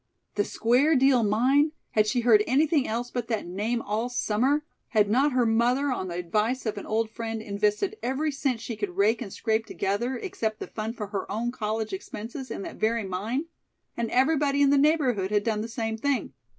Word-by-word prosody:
"The 205 - +1
Square 255 +8 +3
Deal 265 -2 +4
Mine!" 260 +8 +3 0.2
Had 215 -1 +3
she 245 +3 +1
heard 225 -3 +5
anything 290 +2 +2
else 240 +2 -3
but 245 -2 -3
that 225 -3 -2
name 210 +7 -2
all 220 +4 -2
summer? 250 +5 +1 0.2
Had 210 -2 +2
not 270 +5 +3
her 250 -1 +3
mother, 245 +5 +2
on 190 -7 -2
the 170 - -5
advice 210 +9 -1
of 210 -2 -2
an - - -9
old 220 0 0
friend, 225 -1 -4
invested 210 - -1
every 275 +5 -1
cent 270 -4 -1
she 230 - -5
could 205 -4 -4
rake 215 +5 +3
and 205 -5 -6
scrape 220 +1 -1
together, 235 +7 -1
except 230 - -3
the - - -4
fund 220 +2 -5
for 210 -3 -5
her 200 -2 -4
own 230 +4 -1
college 220 -2 -3
expenses, 230 +7 -6
in - - -5
that - - -8
very 225 +1 +1
mine? 210 - -2 0.5
And 235 -1 -2
everybody 285 +1 +3
in 280 - +4
the 285 - +5
neighborhood 270 -10 +2
had 205 0 +1
done 215 -2 0
the 225 - -4
same 225 -1 -3
thing. 265 - -1
230 Hz, 205 wpm, -26 LUFS, 215-260 Hz, 0.5 s, heard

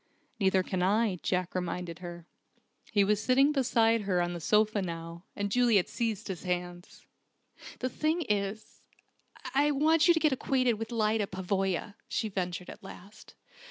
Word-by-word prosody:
"Neither 190 -2 +3
can 185 0 -2
I," 200 0 +2
Jack 180 -1 -1
reminded 180 -1 -4
her. 175 -2 -8 0.7
He 205 -3 +4
was 210 +1 +1
sitting 270 +4 +4
beside 230 -5 +2
her 190 -3 0
on 175 0 0
the 175 - -5
sofa 210 +4 +2
now, 170 0 -6
and 200 0 -2
Juliet 235 -6 +3
seized 225 -3 -3
his 190 -4 -5
hands. 175 -1 -5 0.8
"The 255 - 0
thing 315 +5 0
is 210 -2 -3 0.7
I 285 +2 +3
want 310 +3 +3
you 345 - +6
to - - +2
get 310 -2 +3
acquainted 255 -3 +1
with 225 +1 -5
Lyda 215 -2 +1
Pavoya," 190 +1 -2
she 220 - -2
ventured 180 -2 -4
at - - -13
last. 195 +1 -13
205 Hz, 160 wpm, -30 LUFS, 180-235 Hz, 0.8 s, you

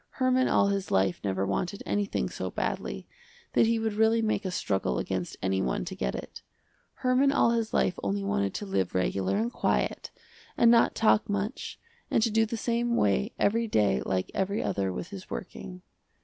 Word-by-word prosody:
Herman 255 0 +2
all 200 - +3
his 200 -1 -2
life 95 -1 +1
never 95 -1 0
wanted 135 - -2
anything 200 - -1
so - - -4
badly, 65 0 -3 0.5
that - - +4
he 230 0 +2
would 220 -1 -1
really 220 +2 +3
make 215 -1 0
a - - 0
struggle 95 - -1
against 95 +2 -3
any 95 0 +1
one 60 - -1
to - - -6
get 65 - -2
it. - - -8 0.6
Herman 255 +2 +4
all 235 - +3
his 230 -2 -1
life 180 - +1
only 100 0 -1
wanted 100 0 -1
to 205 - -4
live 95 - -1
regular 95 - 0
and 230 +3 -1
quiet, - - -1 0.5
and 235 - +6
not 235 -1 +4
talk 215 -1 +3
much 205 +4 -3 0.3
and 225 - +2
to 225 - +1
do 225 +1 +3
the 230 - -4
same 235 +1 0
way 100 - +2
every 230 +3 +1
day 105 - +2
like 95 +6 -2
every 200 +2 -1
other 95 -1 -1
with 130 - -5
his 195 -2 -9
working. 180 -1 -7
195 Hz, 190 wpm, -28 LUFS, -, 0.6 s, and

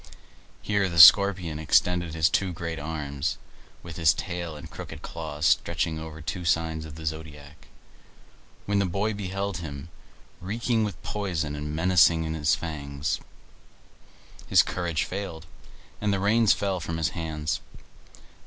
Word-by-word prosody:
Here 100 -2 +1
the 85 - -5
Scorpion 90 -3 +7
extended 85 +1 +2
his 80 -1 +4
two 95 +2 0
great 85 -2 -5
arms, 75 -1 -3 0.5
with 85 -1 -9
his 80 -3 +4
tail 85 -3 -5
and 75 - -9
crooked - - -9
claws 80 -2 -5
stretching 80 0 +1
over 80 0 -8
two 90 +4 -4
signs 80 -1 0
of 75 -1 -10
the 80 0 -9
zodiac. 75 -1 -7 1.0
When 100 0 +1
the 100 - +1
boy 100 +5 -1
beheld 100 -1 -3
him, 75 -2 -7 0.5
reeking 115 +4 0
with 100 -6 -4
poison 85 -8 -2
and 75 +1 -5
menacing 85 -1 +4
with 80 0 -3
his 80 +1 +2
fangs, 75 -3 -4 1.3
his - - +6
courage 85 -3 -2
failed, 90 -4 -6 0.6
and 105 -1 +1
the 100 - 0
reins 110 +2 +4
fell 95 -2 0
from 80 +1 -4
his 80 - 0
hands. 80 -3 -3
80 Hz, 145 wpm, -26 LUFS, 80-95 Hz, 1.3 s, Scorpion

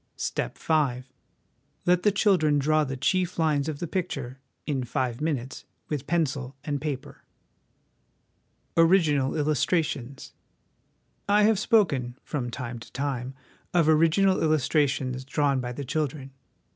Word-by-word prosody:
" - - -47 0.2
Step - - -3
V. 140 -6 +1 0.8
Let 180 0 +3
the 210 - +3
children 185 -7 +3
draw 155 +2 +2
the 135 -2 -4
chief 180 +6 0
lines 155 -3 +1
of 150 - -4
the 175 - -4
picture, 145 -8 -4 0.3
in 135 -4 -1
five 125 0 -2
minutes, 135 -5 -3 0.3
with 150 -4 -3
pencil 140 -5 -1
and 145 -2 -3
paper." 145 -4 -5 1.5
Original 165 -6 +3
Illustrations. 150 -3 -1 1.0
I 210 +1 +5
have 215 -1 +4
spoken, 145 - +2
from 130 -5 -3
time 120 -1 -6
to - - -13
time, 135 -2 -3 0.4
of 170 -3 +4
original 165 +5 +4
illustrations 140 -4 +1
drawn 140 0 +1
by 125 -1 -4
the 140 +3 -6
children. 140 -1 -3
145 Hz, 130 wpm, -26 LUFS, 130-165 Hz, 1.5 s, I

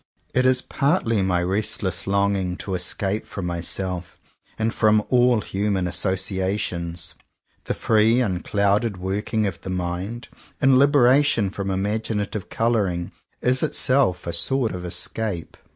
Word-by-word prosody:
It 130 0 +3
is 130 0 +3
partly 135 - +1
my 90 -2 +1
restless 95 0 -2
longing 100 -2 +1
to 95 - -5
escape 95 +3 -1
from 95 - -5
myself 90 +1 -3 0.4
and 110 +1 0
from 110 -1 +3
all 125 -3 +4
human 100 -1 -1
associa 95 +2 -1
tions. 85 -3 -4 0.5
The - - -1
free 110 +2 +3
unclouded 100 0 +1
working 100 +4 -1
of 95 -4 -4
the - - -7
mind, 90 +6 -4 0.3
in 135 -1 +5
liberation 135 -6 +4
from 100 0 -4
imaginative 105 +1 -2
colour 115 -3 +1
ing, 85 -1 -4 0.3
is 130 +1 +2
itself 130 - +2
a 85 - -3
sort 120 +7 0
of 90 0 -6
escape. 90 0 -3
100 Hz, 135 wpm, -23 LUFS, 90-115 Hz, 0.5 s, in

